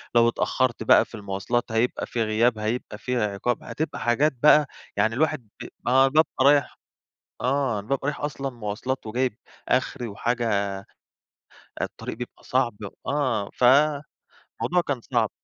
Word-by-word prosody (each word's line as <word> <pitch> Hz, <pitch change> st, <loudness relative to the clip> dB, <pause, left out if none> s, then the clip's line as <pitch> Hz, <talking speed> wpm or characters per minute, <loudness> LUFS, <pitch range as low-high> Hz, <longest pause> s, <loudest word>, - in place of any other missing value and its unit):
لو 120 Hz, 0 st, +6 dB
اتأخرت 120 Hz, 0 st, 0 dB
بقى -, -, +6 dB
في -, -, -12 dB
المواصلات 105 Hz, +3 st, -2 dB
هيبقى 115 Hz, +2 st, 0 dB
في 115 Hz, -, -1 dB
غياب، 110 Hz, +2 st, +2 dB
هيبقى 110 Hz, 0 st, -3 dB
في 125 Hz, +3 st, -3 dB
عقاب، 105 Hz, +2 st, -1 dB
هتبقى 155 Hz, -, -4 dB
حاجات 135 Hz, +6 st, +2 dB
بقى 150 Hz, -1 st, +7 dB, 0.3 s
يعني 110 Hz, +2 st, +2 dB
الواحد 150 Hz, -5 st, 0 dB
ب -, -, -6 dB, 0.2 s
آه، 130 Hz, +2 st, +5 dB
بابقى 145 Hz, -2 st, +2 dB
رايح 140 Hz, -1 st, +3 dB, 0.6 s
آه، 130 Hz, -4 st, +1 dB
أنا 100 Hz, -, -8 dB
بابقي 135 Hz, 0 st, -1 dB
رايح 145 Hz, -, -3 dB
أصلًا 140 Hz, -2 st, -3 dB
مواصلات، 120 Hz, +2 st, -4 dB
وجايب 120 Hz, +1 st, -1 dB, 0.3 s
آخري 125 Hz, 0 st, 0 dB
وحاجة 100 Hz, -3 st, -1 dB, 1.0 s
الطريق -, -, -5 dB
بيبقى 125 Hz, -, -8 dB
صعب 125 Hz, -4 st, 0 dB, 0.3 s
آه، 130 Hz, -7 st, 0 dB
فموضوع 140 Hz, +3 st, +3 dB, 0.7 s
كان 135 Hz, -4 st, -1 dB
صعب. 115 Hz, -2 st, 0 dB
120 Hz, 140 wpm, -25 LUFS, 110-135 Hz, 1.0 s, بقى